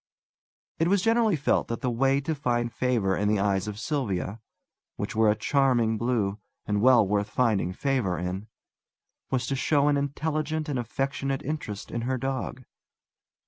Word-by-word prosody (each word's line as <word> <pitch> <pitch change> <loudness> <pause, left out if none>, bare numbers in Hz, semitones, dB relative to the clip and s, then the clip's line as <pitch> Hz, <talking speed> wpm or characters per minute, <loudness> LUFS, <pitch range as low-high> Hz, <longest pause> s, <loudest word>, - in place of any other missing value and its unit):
It 165 - +3
was 195 0 +2
generally 225 -3 +3
felt 145 - +1
that 115 - -4
the 125 - 0
way 135 +3 +2
to 160 +3 -2
find 120 -5 -1
favour 115 -7 +1
in 105 - 0
the 105 0 +3
eyes 100 0 +1
of 105 -1 -5
Sylvia 110 - -2 0.5
which - - -4
were 110 -1 +4
a 105 - +3
charming 120 -2 +2
blue, 110 -4 0 0.3
and 105 -1 0
well 120 -4 +6
worth 105 +1 0
finding 110 -9 +1
favour 120 -4 0
in 90 +4 -4 0.8
was 130 -1 0
to 135 - -1
show 145 +2 +2
an 145 - +3
intelligent 155 +2 -2
and 140 -4 -1
affectionate 135 +3 -2
interest 135 -9 -5
in 120 - -2
her 130 +2 -1
dog. 130 0 -3
125 Hz, 165 wpm, -27 LUFS, 105-140 Hz, 0.8 s, well